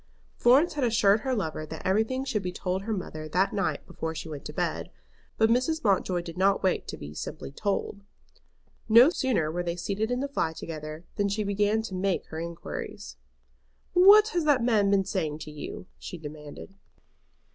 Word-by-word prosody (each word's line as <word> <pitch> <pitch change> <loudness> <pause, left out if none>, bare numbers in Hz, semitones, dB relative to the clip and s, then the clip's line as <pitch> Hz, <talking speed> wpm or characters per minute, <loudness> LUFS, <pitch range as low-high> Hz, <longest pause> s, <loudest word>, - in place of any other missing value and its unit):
Florence 270 +8 +4
had 290 - -2
assured 220 -3 +4
her 260 +3 -1
lover 160 -7 -3
that 160 +1 -8
everything 220 +7 +1
should 235 -6 -1
be 180 -1 -3
told 185 +1 -2
her 220 +3 -5
mother 155 -6 -4
that 185 +5 +1
night 175 -8 -1
before 160 0 -5
she 160 - -6
went 150 -3 -7
to - - -6
bed. - - -2 0.5
But 220 0 +4
Mrs. 260 +7 +1
Mountjoy 190 -3 +2
did 170 +1 -8
not 195 +1 +3
wait 185 - +1
to - - -6
be 75 0 -8
simply 80 - -6
told. 200 +4 -2 0.9
No 235 +8 +8
sooner 235 - 0
were 175 +2 -2
they 170 -1 -2
seated 200 +5 -2
in 245 0 0
the 280 - -1
fly 165 -13 -1
together 155 0 -7
than 200 0 +1
she 210 +2 -1
began 205 +2 +1
to 210 - -6
make 185 0 -1
her 160 - -5
inquiries. 170 - -6 0.8
"What 405 +4 +8
has 350 -5 0
that 280 -5 +3
man 215 -4 +3
been 195 -1 +3
saying 165 -6 -2
to 155 -1 -8
you?" 150 +4 -7
she 180 - -7
demanded. 150 +3 -9
195 Hz, 190 wpm, -27 LUFS, 165-230 Hz, 0.9 s, No